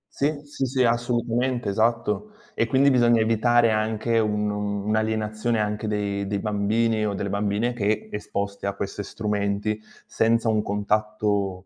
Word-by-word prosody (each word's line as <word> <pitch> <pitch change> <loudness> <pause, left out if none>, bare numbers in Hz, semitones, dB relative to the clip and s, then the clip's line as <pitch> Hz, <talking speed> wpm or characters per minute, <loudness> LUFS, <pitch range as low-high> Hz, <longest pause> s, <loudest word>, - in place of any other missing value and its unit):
Sì, 145 +1 0
sì, 145 -2 -3
sì, 130 0 +1
assolutamente, 120 0 0
esatto. 115 - 0 0.2
E 115 - +2
quindi 135 +3 +4
bisogna 120 -3 +4
evitare 115 +1 +3
anche 110 +1 0
un 105 -1 0
un'alienazione 110 +2 -1
anche 105 +1 -2
dei 100 -1 -2
dei 100 0 -1
bambini 110 +2 +1
o 105 - -1
delle 100 0 -3
bambine 105 +4 0
che 105 -2 -1
esposti 100 -1 -4
a 100 - -1
questi 100 +1 -4
strumenti 105 0 -2 0.3
senza 115 0 +2
un 110 -1 +2
contatto, 105 -2 -1
110 Hz, 140 wpm, -24 LUFS, 105-115 Hz, 0.3 s, quindi